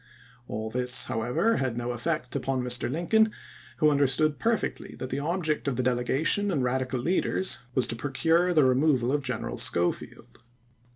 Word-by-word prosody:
All 110 Hz, +1 st, -5 dB
this, 125 Hz, +1 st, +4 dB
however, 125 Hz, -, 0 dB
had 130 Hz, -3 st, -2 dB
no 120 Hz, 0 st, -3 dB
effect 140 Hz, +3 st, -3 dB
upon 130 Hz, -2 st, -1 dB
^Ir. 125 Hz, 0 st, -1 dB
Lincoln, 215 Hz, +8 st, +2 dB, 0.5 s
who 155 Hz, -2 st, +4 dB
understood 145 Hz, +2 st, +2 dB
perfectly 230 Hz, -1 st, -2 dB
that 130 Hz, -, -6 dB
the 135 Hz, -, -2 dB
object 155 Hz, -1 st, -2 dB
of 135 Hz, -, 0 dB
the 130 Hz, -, -1 dB
delegation 130 Hz, +11 st, +1 dB
and 145 Hz, -9 st, 0 dB
Radical 130 Hz, 0 st, -1 dB
leaders 180 Hz, +1 st, 0 dB, 0.2 s
was 130 Hz, -, +3 dB
to -, -, -4 dB
procure 160 Hz, +8 st, +1 dB
the 155 Hz, -4 st, +4 dB
removal 130 Hz, -1 st, +2 dB
of 145 Hz, 0 st, 0 dB
General 125 Hz, -4 st, -4 dB
Schofield. 85 Hz, -7 st, -2 dB
130 Hz, 160 wpm, -27 LUFS, 125-160 Hz, 0.5 s, this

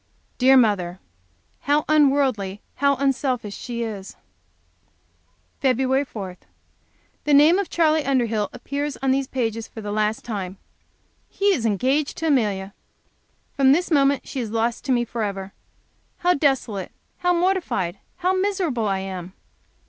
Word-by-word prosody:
Dear 265 Hz, +1 st, +6 dB
mother! 190 Hz, -7 st, +2 dB, 0.6 s
How 290 Hz, +2 st, +1 dB
unworldly, 270 Hz, -10 st, +2 dB, 0.2 s
how 280 Hz, +1 st, +3 dB
unselfish 255 Hz, -5 st, -1 dB
she 235 Hz, -1 st, -4 dB
is! 205 Hz, -4 st, -6 dB, 1.5 s
Feb. 265 Hz, +1 st, +2 dB
4. 190 Hz, -6 st, -7 dB, 0.9 s
The 295 Hz, -, +2 dB
name 310 Hz, +6 st, +6 dB
of 400 Hz, -, -2 dB
Charley 315 Hz, -2 st, +2 dB
Underhill 230 Hz, -7 st, 0 dB
appears 285 Hz, +1 st, -4 dB
on 265 Hz, -, +3 dB
these 270 Hz, 0 st, +1 dB
pages 230 Hz, -4 st, -2 dB
for -, -, -10 dB
the 205 Hz, -1 st, -5 dB
last 215 Hz, +1 st, -1 dB
time. 195 Hz, -5 st, -4 dB, 0.7 s
He 400 Hz, 0 st, +2 dB
is 235 Hz, -10 st, 0 dB
engaged 260 Hz, +8 st, 0 dB
to 325 Hz, -, -3 dB
Amelia! 205 Hz, -8 st, 0 dB, 0.8 s
From 270 Hz, -1 st, +5 dB
this 345 Hz, +3 st, 0 dB
moment 280 Hz, -2 st, +3 dB
she 270 Hz, -, -4 dB
is 230 Hz, -3 st, -3 dB
lost 230 Hz, +1 st, -1 dB
to -, -, 0 dB
me 240 Hz, -1 st, +2 dB
forever. 200 Hz, -4 st, -4 dB, 0.6 s
How 355 Hz, +1 st, +3 dB
desolate, 265 Hz, -, 0 dB, 0.3 s
how 355 Hz, -1 st, +2 dB
mortified, 340 Hz, -, 0 dB, 0.2 s
how 365 Hz, +1 st, 0 dB
miserable 370 Hz, -, 0 dB
I 195 Hz, -1 st, 0 dB
am! 190 Hz, -1 st, -6 dB
255 Hz, 135 wpm, -23 LUFS, 210-285 Hz, 1.5 s, Dear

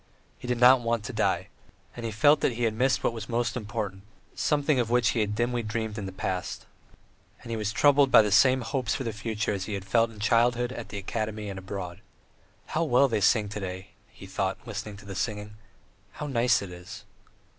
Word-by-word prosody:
He -, -, -8 dB
did 125 Hz, -1 st, -1 dB
not 125 Hz, +1 st, +7 dB
want 115 Hz, -2 st, -1 dB
to -, -, -6 dB
die; -, -, 0 dB, 0.5 s
and 120 Hz, -, -7 dB
he 115 Hz, -, -2 dB
still 105 Hz, -, -11 dB
felt 145 Hz, +1 st, +6 dB
that -, -, +1 dB
he 120 Hz, +1 st, -3 dB
had 115 Hz, -2 st, +2 dB
missed 130 Hz, +4 st, +1 dB
what -, -, +1 dB
was 115 Hz, -1 st, -7 dB
most 115 Hz, -2 st, 0 dB
important, 105 Hz, -4 st, -4 dB, 0.3 s
something 145 Hz, -2 st, +1 dB
of 120 Hz, -2 st, 0 dB
which 120 Hz, -1 st, +3 dB
he -, -, 0 dB
had 105 Hz, -1 st, 0 dB
dimly 120 Hz, +1 st, 0 dB
dreamed 110 Hz, -1 st, -3 dB
in 100 Hz, -3 st, -5 dB
the -, -, -6 dB
past; 95 Hz, -1 st, -4 dB, 0.8 s
and 115 Hz, -, -8 dB
he -, -, -1 dB
was 105 Hz, -1 st, -2 dB
troubled 140 Hz, +2 st, +4 dB
by 115 Hz, -, +8 dB
the 105 Hz, -, -1 dB
same 130 Hz, +6 st, +5 dB
hopes 125 Hz, -4 st, -1 dB
for 135 Hz, -, -3 dB
the 115 Hz, -3 st, -3 dB
future 110 Hz, 0 st, -2 dB
as 95 Hz, -2 st, -3 dB
he 105 Hz, -, -3 dB
had 100 Hz, -1 st, -6 dB
felt 115 Hz, +2 st, +2 dB
in 110 Hz, -, -14 dB
childhood, 120 Hz, +3 st, +2 dB
at 115 Hz, -3 st, -7 dB
the 100 Hz, -, -6 dB
academy 105 Hz, +1 st, -4 dB
and 95 Hz, -, -6 dB
abroad. 95 Hz, -2 st, -6 dB, 0.6 s
"How 165 Hz, -, -1 dB
well 140 Hz, -2 st, +4 dB
they 110 Hz, -5 st, -1 dB
sing 105 Hz, +2 st, +3 dB
to 105 Hz, -, -5 dB
day!" 95 Hz, 0 st, -6 dB, 0.2 s
he -, -, -13 dB
thought, -, -, -2 dB
listening 105 Hz, -2 st, -6 dB
to 100 Hz, -, -14 dB
the 100 Hz, -, -7 dB
singing. 105 Hz, +1 st, -4 dB, 0.6 s
"How 150 Hz, -, -6 dB
nice 125 Hz, -5 st, +2 dB
it 95 Hz, -, -8 dB
is!" 90 Hz, 0 st, -10 dB
110 Hz, 225 wpm, -27 LUFS, 105-120 Hz, 0.8 s, by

